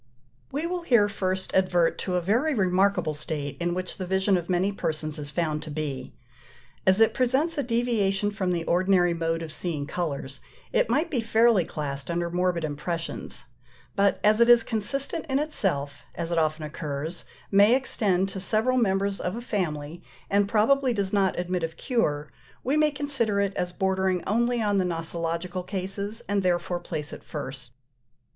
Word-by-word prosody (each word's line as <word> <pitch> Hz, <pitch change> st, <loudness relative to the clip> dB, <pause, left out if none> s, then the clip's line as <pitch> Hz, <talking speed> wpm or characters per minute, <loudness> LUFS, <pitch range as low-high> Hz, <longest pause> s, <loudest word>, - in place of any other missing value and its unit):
We 295 Hz, +4 st, -2 dB
will 355 Hz, +1 st, -2 dB
here 235 Hz, -11 st, +4 dB
first 190 Hz, -2 st, -2 dB
advert 180 Hz, -3 st, +2 dB
to 185 Hz, -, -2 dB
a 180 Hz, -, +1 dB
very 240 Hz, -, +1 dB
remarkable 185 Hz, -4 st, +2 dB
state 145 Hz, -1 st, -4 dB
in 175 Hz, 0 st, -1 dB
which 185 Hz, 0 st, -4 dB
the 185 Hz, -, -4 dB
vision 190 Hz, +1 st, +2 dB
of 175 Hz, -1 st, -2 dB
many 185 Hz, +2 st, +2 dB
persons 155 Hz, -4 st, -3 dB
is 145 Hz, -1 st, -3 dB
found 155 Hz, -1 st, -1 dB
to 155 Hz, -, -8 dB
be. 145 Hz, -5 st, -5 dB, 0.7 s
As 190 Hz, +2 st, +5 dB
it 225 Hz, -, +5 dB
presents 265 Hz, +6 st, +1 dB
a 285 Hz, -, 0 dB
deviation 225 Hz, -5 st, +1 dB
from 190 Hz, -3 st, -1 dB
the 170 Hz, -2 st, -1 dB
ordinary 180 Hz, 0 st, +3 dB
mode 165 Hz, 0 st, -1 dB
of 160 Hz, -, -5 dB
seeing 155 Hz, -2 st, -3 dB
colours, 140 Hz, -5 st, -4 dB, 0.3 s
it -, -, +2 dB
might 295 Hz, +8 st, +1 dB
be 250 Hz, -6 st, +1 dB
fairly 225 Hz, -4 st, +4 dB
classed 140 Hz, -1 st, -3 dB
under 170 Hz, 0 st, -1 dB
morbid 180 Hz, -1 st, 0 dB
impressions; 155 Hz, +2 st, -4 dB, 0.5 s
but 200 Hz, 0 st, +2 dB
as 215 Hz, +2 st, +4 dB
it 235 Hz, -, +6 dB
is 240 Hz, -1 st, +8 dB
consistent 275 Hz, +9 st, -1 dB
in 265 Hz, -, +2 dB
itself, 180 Hz, -, -1 dB
as 170 Hz, 0 st, -3 dB
it 170 Hz, -, +2 dB
often 155 Hz, 0 st, 0 dB
occurs, 150 Hz, +2 st, -4 dB, 0.3 s
may 205 Hz, +4 st, +6 dB
extend 200 Hz, -8 st, +1 dB
to 190 Hz, -, -5 dB
several 220 Hz, +7 st, +3 dB
members 195 Hz, -2 st, +1 dB
of 180 Hz, +3 st, -2 dB
a -, -, -4 dB
family, 170 Hz, -8 st, -3 dB, 0.3 s
and 200 Hz, 0 st, +3 dB
probably 250 Hz, +5 st, +3 dB
does 200 Hz, -3 st, -2 dB
not 195 Hz, -2 st, +2 dB
admit 180 Hz, 0 st, -1 dB
of 165 Hz, -1 st, -4 dB
cure, 150 Hz, -, -1 dB, 0.3 s
we 270 Hz, +4 st, +1 dB
may 305 Hz, 0 st, +4 dB
consider 275 Hz, -8 st, 0 dB
it 200 Hz, -1 st, 0 dB
as 180 Hz, 0 st, -2 dB
bordering 190 Hz, -1 st, 0 dB
only 235 Hz, +2 st, +1 dB
on 205 Hz, -2 st, +2 dB
the -, -, +2 dB
nosological 170 Hz, +1 st, -2 dB
cases, 200 Hz, +4 st, -4 dB
and 200 Hz, 0 st, +1 dB
therefore 175 Hz, -1 st, 0 dB
place 155 Hz, -3 st, -5 dB
it -, -, -9 dB
first. 135 Hz, -4 st, -7 dB
185 Hz, 175 wpm, -26 LUFS, 165-220 Hz, 0.7 s, is